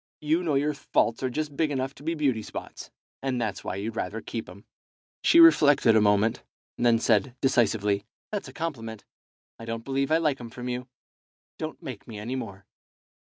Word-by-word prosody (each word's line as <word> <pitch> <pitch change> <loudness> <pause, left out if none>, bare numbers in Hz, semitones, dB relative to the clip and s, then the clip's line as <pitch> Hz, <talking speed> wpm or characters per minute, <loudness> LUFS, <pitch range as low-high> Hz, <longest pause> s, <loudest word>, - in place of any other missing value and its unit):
You 155 +3 +2
know 160 -5 0
your 145 +2 +1
faults 115 -4 0
are 130 - 0
just 150 +2 -3
big 155 +1 +1
enough 135 -1 -2
to - - -16
be 165 +3 -2
beauty 135 -7 +1
spots, - - -8 0.3
and 130 -2 -1
that's 105 -5 -3
why - - -3
you'd 105 +3 -4
rather 110 +1 -3
keep 115 -1 -6
'em." 100 +3 -13 0.6
She 335 - +6
reflected 145 - +7
a 110 - +6
moment, 105 +3 +3 0.3
and 120 - +1
then 115 -1 +5
said, 115 +2 +2
decisively 105 -6 +2 0.3
"That's 205 -2 -3
a - - -9
compliment. 115 -10 -5 0.5
I 115 - -8
don't 115 0 -5
believe 135 0 0
I 160 - +5
like 150 -5 0
'em 120 - -7
from 125 +2 -6
you. 125 +1 -4 0.7
Don't - - -6
make - - -7
me 110 - -8
any 115 +5 -4
more." 100 -6 -6
125 Hz, 195 wpm, -27 LUFS, 110-145 Hz, 0.7 s, reflected